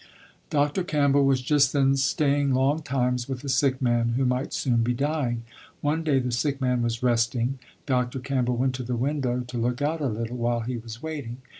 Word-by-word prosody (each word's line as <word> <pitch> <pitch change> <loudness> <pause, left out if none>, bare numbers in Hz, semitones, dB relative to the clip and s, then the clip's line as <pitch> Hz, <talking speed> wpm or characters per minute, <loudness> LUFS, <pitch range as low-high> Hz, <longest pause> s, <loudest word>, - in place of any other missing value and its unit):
Dr. 145 +5 +1
Campbell 140 -4 +3
was 135 -1 +2
just 140 -1 +3
then 135 -1 +3
staying 140 0 +2
long 140 +4 +2
times 125 -3 -1
with 130 0 -4
a 140 - -4
sick 135 -1 +2
man 120 -1 +2
who 130 +2 +1
might 125 +2 0
soon 125 -4 0
be 120 +1 0
dying. 135 -4 -1 0.4
One 155 +3 0
day 150 -4 +2
the 125 -1 0
sick 135 +3 -1
man 125 -2 +1
was 115 +1 -2
resting. 120 +2 +1 0.3
Dr. 125 -1 0
Campbell 125 -2 -1
went 130 +1 +1
to 130 0 -4
the 125 +1 -2
window 125 -1 -1
to 125 0 -7
look 120 +2 -1
out 155 +3 -1
a 140 - +1
little, 115 +1 -3
while 120 0 0
he 120 +2 -3
was 115 +2 -9
waiting. 145 -7 -5
130 Hz, 200 wpm, -26 LUFS, 120-140 Hz, 0.4 s, Campbell